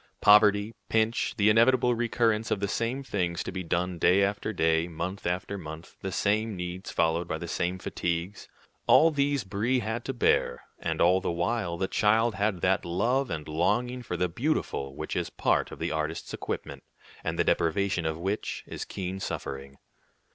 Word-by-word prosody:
Poverty, 105 +1 +5 0.2
pinch, 110 +1 +1
the 100 -1 +3
inevitable 125 +2 +4
recurrence 115 -2 +1
of 105 - 0
the 100 - -1
same 115 +6 -2
things 90 -8 -2
to - - -5
be 95 0 -4
done 90 +1 -1
day 95 +4 +4
after 100 +2 -1
day, 80 -3 +2
month 90 +3 -4
after 90 +3 -2
month, 80 -1 -9
the 95 - -3
same 105 +3 0
needs 90 +1 -5
followed 85 +1 +1
by 80 - -2
the 85 - -6
same 90 +2 -1
fatigues, 85 +1 -3 0.4
all 165 +1 +7
these 140 -2 +1
Brie 105 +7 0
had 110 +2 -3
to - - -1
bear; 65 - +1 0.2
and 80 -1 -2
all 90 +2 +4
the - - -2
while 85 +1 -1
the 95 - -1
child 110 +3 +3
had 100 -4 -1
that 95 +2 +2
love 115 +10 0
and 80 -4 -4
longing 120 +11 0
for 90 -7 -4
the 90 - +1
beautiful 85 - -2
which - - -5
is - - -1
part - - +1
of - - -8
the - - -2
artist's 80 +1 -3
equipment, - - -5 0.4
and - - -2
the - - +3
deprivation 90 +2 +1
of 80 0 -2
which 95 +5 -3
is - - -6
keen 95 0 -5
suffering. 70 -6 -5
95 Hz, 180 wpm, -28 LUFS, 85-110 Hz, 0.4 s, all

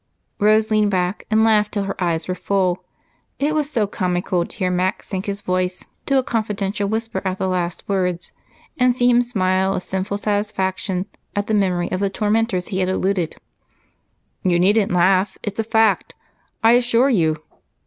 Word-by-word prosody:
Rose 215 +1 +3
leaned 215 -1 +3
back 185 0 -1
and 220 0 +3
laughed 215 -2 +3
until 200 -1 0
her 195 -1 -3
eyes 165 -2 -1
were 185 - -1
full. 185 -1 0 0.5
It 295 +2 0
was 300 -2 0
so 230 -8 +1
comical 180 -2 -1
to - - -14
hear 185 -3 0
Mac 180 +1 0
sink 190 0 -5
his 200 0 -3
voice 185 -1 -2 0.2
to 275 - +3
a 260 - +3
confidential 210 -3 -2
whisper 220 -3 -2
at 190 -1 -2
the 190 - -1
last 180 -2 -2
words 180 -3 -1 0.5
and 250 -1 +4
see 245 -1 +2
him 245 0 +5
smile 190 -5 +1
with - - -3
sinful 190 +2 -3
satisfaction 195 -3 -1 0.3
at 205 0 0
the 220 - -2
memory 185 -4 +1
of 185 - -1
the 200 0 +1
tormentors 210 -2 0
he 190 - -2
had 185 -1 +1
eluded. 185 -3 0 1.1
"You 180 -2 +2
needn't 205 +3 +3
laugh 185 +2 +2
it's 205 +1 -5
a - - +2
fact, 220 -2 +2 0.5
I 225 - +7
assure 245 +2 +3
you. 160 -8 +2
195 Hz, 180 wpm, -21 LUFS, 185-220 Hz, 1.1 s, I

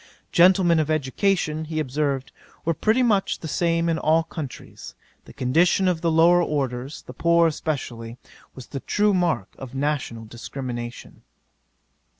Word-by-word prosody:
Gentlemen 175 -1 +5
of 155 -1 0
education, 155 +2 0
he 155 0 -3
observed, 140 -1 -2 0.3
were 165 - +2
pretty 220 +10 +2
much 205 -5 +1
the 160 - -7
same 165 +1 +1
in 165 -1 0
all 160 +1 +3
countries; 160 -5 -8 0.3
the - - -13
condition 165 +9 +2
of 175 -3 0
the 170 - +1
lower 170 +2 +5
orders, 135 -3 -3
the 125 - -10
poor 170 +5 +3
especially, 125 -7 -3 0.4
was 130 - -9
the 135 - -6
true 210 +8 +1
mark 170 - 0
of 130 0 -9
national 135 -5 -2
discrimination." 120 +1 -7
155 Hz, 145 wpm, -23 LUFS, 130-170 Hz, 0.4 s, Gentlemen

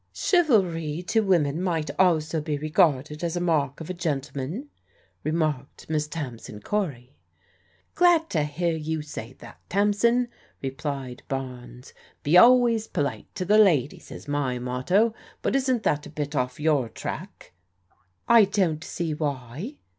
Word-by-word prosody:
" - - -45 0.2
Chivalry 180 - +2
to 225 - +3
women 170 -7 +2
might 165 -4 -1
also 160 -3 +2
be 150 -1 -2
regarded 150 0 +1
as 170 0 -1
a - - 0
mark 150 -6 0
of 160 - -7
a 185 - -3
gentleman," 155 - -4 0.5
remarked 155 -4 -2
Miss 150 -1 0
Tamsin 125 -9 -7
Cory. 140 - -3 0.4
" - - -38
Glad 345 -2 +4
to 160 - +1
hear 160 +3 -1
you 160 0 -3
say 130 -5 -8
that, - - -14
Tamsin," 210 +5 +2 0.3
replied 135 -2 -5
Barnes. 125 -2 -6
" - - -32
Be 150 +4 +2
always 235 +1 +6
polite 140 -2 -2
to 185 -3 -3
the 210 +3 +5
ladies 155 - +2
is - - -10
my 145 -3 -1
motto; 130 - +1 0.3
but - - 0
isn't 260 -4 +1
that 150 0 0
a - - -10
bit 150 -1 -4
off 125 0 -1
your 150 -6 +2
track? 110 - -7 0.2
" 90 -1 -40
" 90 -2 -44
I 230 -3 +7
don't 185 -6 0
see 170 -3 -3
why." 145 - -4
155 Hz, 155 wpm, -25 LUFS, 140-190 Hz, 0.5 s, I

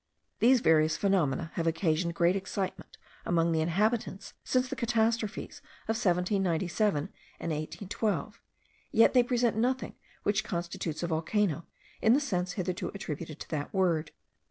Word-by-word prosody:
These 250 +1 +5
various 155 -5 +4
phenomena 170 -5 +1
have 165 -1 -1
occasioned 165 0 +1
great 175 +2 +3
excitement 195 0 -4 0.3
among 170 -1 +2
the 160 -1 +2
inhabitants 195 +5 0
since 255 0 +1
the - - -4
catastrophes 230 -3 0 0.2
of 225 - -1
1797 185 -2 +1 0.4
and 165 - -3
1812: 200 +7 -3 0.5
yet 225 - +5
they 250 - +7
present 240 -2 +1
nothing 255 +3 0 0.3
which 205 0 +1
constitutes 170 -3 -4
a - - 0
volcano, 170 +1 0 0.3
in 220 - +5
the - - +4
sense 180 -10 -1
hitherto 185 -1 -2
attributed 160 -4 -6
to - - -8
that 145 -2 -3
word. 170 -5 +2
185 Hz, 135 wpm, -30 LUFS, 165-220 Hz, 0.5 s, they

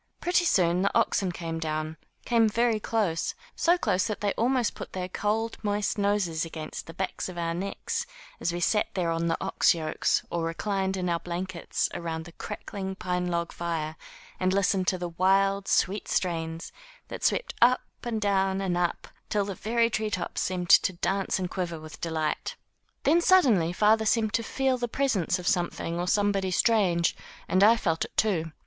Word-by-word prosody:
Pretty 350 0 +2
soon 180 - +3
the 200 - +3
oxen 190 -2 +1
came 165 -1 -5
down, 155 0 -3 0.3
came 230 -2 +4
very 230 0 +1
close, 205 -7 -1 0.2
so 345 +1 +3
close 185 - +1
that 215 - -3
they 205 -1 0
almost 245 0 +1
put - - -9
their 185 -1 -3
cold, 215 +4 -1
moist 205 -1 0
noses 200 -6 +1
against 160 -2 -7
the 165 - -8
backs 190 0 -3
of 180 - -9
our 165 -1 -1
necks 195 +3 -3 0.3
as 170 - 0
we 175 - -3
sat 210 +4 +2
there 175 -3 0
on 165 0 0
the 165 - +1
ox - - +3
yokes 155 -2 0
or 170 -1 -1
reclined 190 +3 -1
in 180 -1 -2
our 170 -1 0
blankets, 175 +1 -3
around 160 -1 -4
the 175 - -11
crackling 190 0 -6
pine 180 -1 -2
log 170 -1 -1
fire 160 -2 -3 0.4
and 185 0 +1
listened 190 -1 +1
to 185 - +2
the 175 -1 -4
wild, 195 +3 +2
sweet 200 +3 +1
strains 165 -2 -2 0.4
that - - -7
swept - - +1
up 250 +2 +5 0.2
and 235 -2 -2
down 195 -2 +1
and 190 -2 -1
up 175 -1 -1 0.2
till 205 -2 +1
the 200 - -4
very 230 +4 +1
tree 215 -1 -1
tops 185 -4 -3
seemed 180 -2 -1
to 185 - +6
dance 195 +3 -1
and 185 -1 -3
quiver 175 -4 -3
with 155 0 -11
delight. 160 -2 -2 0.5
Then 330 +4 +4
suddenly 250 - +4
father 215 +4 +3
seemed 220 -2 +2
to 230 - +2
feel 260 +2 0
the 240 - -1
presence 235 - 0
of 180 -1 -6
some 175 -1 +2
thing 170 +1 -4
or 175 - -2
somebody 200 -1 +1
strange, 185 -4 +2 0.3
and 185 +3 +3
I 225 +3 +7
felt 165 -7 0
it, - - -9
too. 170 -7 +1
185 Hz, 185 wpm, -27 LUFS, 170-210 Hz, 0.5 s, I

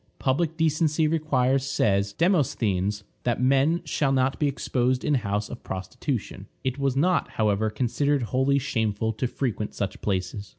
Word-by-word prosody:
Public 155 +4 0
decency 160 -1 +2
requires, 135 -4 +1
says 100 -7 +1
Demosthenes, 105 - +1 0.2
that 120 -1 0
men 135 +6 +3
shall 140 -3 0
not 130 0 +1
be 150 - +2
exposed 130 -2 0
in 150 - +2
houses 105 -5 -1
of 120 - -8
prostitution. 100 +1 -4 0.2
It 130 +1 -2
was 135 -2 +1
not, 180 +5 +2
however, 110 0 +2
considered 130 +5 0
wholly 130 +4 +1
shameful 110 -5 -1
to 110 +4 -1
frequent 115 -5 -3
such 100 -1 -3
places. 95 0 -2
130 Hz, 145 wpm, -25 LUFS, 105-145 Hz, 0.2 s, men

